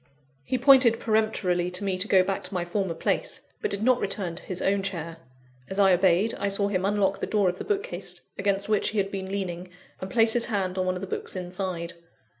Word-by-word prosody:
He 255 Hz, -, -1 dB
pointed 255 Hz, -3 st, +6 dB
peremptorily 215 Hz, -5 st, 0 dB
to 180 Hz, +2 st, -3 dB
me 195 Hz, -2 st, 0 dB
to 195 Hz, -, +2 dB
go 190 Hz, -3 st, +5 dB
back 195 Hz, +1 st, -3 dB
to -, -, -7 dB
my 175 Hz, -1 st, -1 dB
former 180 Hz, -1 st, -2 dB
place, -, -, -1 dB, 0.2 s
but -, -, -1 dB
did 200 Hz, +1 st, -1 dB
not 250 Hz, +1 st, +4 dB
return 195 Hz, -3 st, -2 dB
to -, -, -7 dB
his 185 Hz, -1 st, -5 dB
own 195 Hz, 0 st, +1 dB
chair. 170 Hz, -4 st, -5 dB, 0.5 s
As 190 Hz, -, -3 dB
I 195 Hz, -2 st, +5 dB
obeyed, 185 Hz, +4 st, +3 dB
I 200 Hz, -, 0 dB
saw 200 Hz, 0 st, +1 dB
him 185 Hz, -2 st, -1 dB
unlock 200 Hz, -1 st, +1 dB
the -, -, -3 dB
door 205 Hz, -4 st, +2 dB
of 180 Hz, -, -5 dB
the -, -, -4 dB
bookcase 420 Hz, +3 st, -1 dB, 0.2 s
against 200 Hz, 0 st, 0 dB
which 215 Hz, -1 st, +1 dB
he 220 Hz, -, -5 dB
had 195 Hz, -1 st, 0 dB
been 190 Hz, -1 st, -5 dB
leaning, 185 Hz, -2 st, -4 dB, 0.3 s
and 185 Hz, -, -6 dB
place 225 Hz, 0 st, +3 dB
his 240 Hz, -1 st, +3 dB
hand 190 Hz, -4 st, -2 dB
on 185 Hz, -, 0 dB
one 185 Hz, -, 0 dB
of 180 Hz, -, -6 dB
the -, -, -3 dB
books 190 Hz, -, -5 dB
inside. 180 Hz, -1 st, -4 dB
195 Hz, 230 wpm, -26 LUFS, 185-210 Hz, 0.5 s, pointed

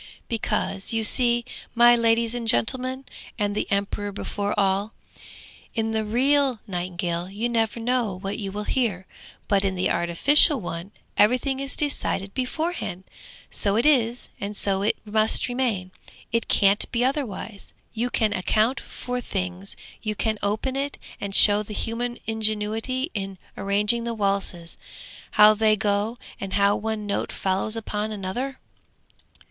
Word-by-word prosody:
'Because 215 Hz, -3 st, 0 dB
you 225 Hz, -1 st, 0 dB
see, 240 Hz, +1 st, +5 dB, 0.3 s
my 240 Hz, +1 st, +7 dB
ladies 230 Hz, 0 st, +2 dB
and 240 Hz, -2 st, -4 dB
gentlemen, 255 Hz, +3 st, +1 dB, 0.3 s
and 205 Hz, -2 st, -1 dB
the 210 Hz, -, -2 dB
emperor 200 Hz, +1 st, -1 dB
before 205 Hz, +1 st, -3 dB
all, 195 Hz, +2 st, 0 dB, 0.8 s
in 225 Hz, 0 st, -1 dB
the 220 Hz, 0 st, 0 dB
real 265 Hz, +4 st, +2 dB
nightingale 175 Hz, -2 st, -3 dB
you 210 Hz, +5 st, -2 dB
never 230 Hz, -1 st, 0 dB
know 235 Hz, -4 st, 0 dB
what 195 Hz, +1 st, -5 dB
you 195 Hz, -2 st, -4 dB
will 210 Hz, +2 st, -4 dB
hear, 210 Hz, -6 st, -1 dB, 0.4 s
but 200 Hz, -1 st, +2 dB
in 190 Hz, -1 st, 0 dB
the 180 Hz, -, 0 dB
artificial 275 Hz, -, +5 dB
one 175 Hz, 0 st, -6 dB, 0.3 s
everything 250 Hz, +5 st, +2 dB
is 275 Hz, 0 st, 0 dB
decided 200 Hz, -9 st, 0 dB
beforehand! 260 Hz, -, -3 dB, 0.5 s
So 200 Hz, -1 st, +1 dB
it 230 Hz, -, +2 dB
is, 245 Hz, -5 st, +3 dB
and 205 Hz, +1 st, -4 dB
so 195 Hz, -1 st, +2 dB
it 205 Hz, -, +1 dB
must 215 Hz, +1 st, +3 dB
remain, 240 Hz, -8 st, -2 dB, 0.4 s
it 230 Hz, 0 st, 0 dB
can't 200 Hz, 0 st, +3 dB
be 245 Hz, 0 st, +1 dB
otherwise. 240 Hz, -6 st, -3 dB, 0.2 s
You 235 Hz, +2 st, -1 dB
can 220 Hz, -3 st, +1 dB
account 215 Hz, +7 st, +1 dB
for 250 Hz, -2 st, -5 dB
things, 185 Hz, -2 st, -4 dB, 0.3 s
you 215 Hz, -1 st, -3 dB
can 220 Hz, 0 st, -1 dB
open 215 Hz, +6 st, -1 dB
it 280 Hz, +1 st, -3 dB, 0.2 s
and 200 Hz, -1 st, -4 dB
show 205 Hz, 0 st, +9 dB
the 210 Hz, 0 st, -7 dB
human 240 Hz, +3 st, -2 dB
ingenuity 220 Hz, +5 st, -1 dB
in 195 Hz, -2 st, -5 dB, 0.2 s
arranging 210 Hz, +4 st, +1 dB
the 235 Hz, -1 st, -3 dB
waltzes, 195 Hz, -5 st, -1 dB, 0.5 s
how 210 Hz, 0 st, +7 dB
they 215 Hz, 0 st, +3 dB
go, 205 Hz, +3 st, -1 dB, 0.2 s
and 195 Hz, -1 st, -5 dB
how 200 Hz, 0 st, +3 dB
one 220 Hz, -1 st, -3 dB
note 200 Hz, -, -2 dB
follows 195 Hz, +3 st, -1 dB
upon 215 Hz, -1 st, -3 dB
another!' 215 Hz, +7 st, -4 dB
215 Hz, 145 wpm, -24 LUFS, 200-240 Hz, 0.8 s, show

